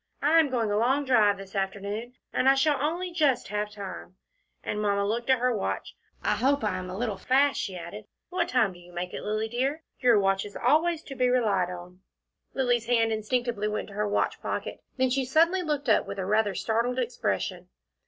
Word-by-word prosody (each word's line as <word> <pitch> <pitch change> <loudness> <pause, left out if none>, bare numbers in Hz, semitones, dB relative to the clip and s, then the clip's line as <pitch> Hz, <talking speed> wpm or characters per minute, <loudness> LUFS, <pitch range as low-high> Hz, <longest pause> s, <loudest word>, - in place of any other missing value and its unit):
I 315 +3 +4
am 310 -3 +3
going 230 -5 0
a 205 - +1
long 265 +5 +2
drive 215 -6 +4
this 195 0 -11
afternoon, 200 +5 -3 0.2
and 260 - +3
I 270 - +6
shall 290 +1 +2
only 345 +5 -1
just 290 -7 +1
have 210 0 -2
time," 200 -3 -8 0.5
and 210 - -2
Mamma 200 -1 +1
looked 235 +4 -2
at 260 - +5
her 250 0 +1
watch. 205 - -3 0.3
"I - - +2
hope 280 +1 +1
I 210 - 0
am 185 0 -7
a 185 - -5
little 215 -3 -2
fast," 270 +7 +2
she 185 -2 -4
added. 175 +5 -8 0.2
"What 365 - -1
time 235 -6 +2
do 175 - -14
you 175 0 -16
make 180 +1 -4
it, - - -5
Lilly 215 +1 -1
dear? 270 +7 -2 0.2
Your 245 -4 +5
watch 195 0 +1
is 205 - -10
always 315 +5 +2
to 275 - -8
be 255 -1 +1
relied 210 -8 +2
on." 180 0 -9 0.6
Lilly's 245 -3 +1
hand 230 -2 +3
instinctively 220 0 -1
went 215 0 -3
to - - -11
her 210 +1 -1
watch 205 - 0
pocket - - -4 0.2
then 260 -1 +2
she 270 +1 +1
suddenly 330 +8 +3
looked 295 -4 -2
up 220 - +3
with 200 - -6
a 190 - -2
rather 210 0 +1
startled 235 +3 0
expression. 250 -1 -2
230 Hz, 210 wpm, -27 LUFS, 205-265 Hz, 0.6 s, I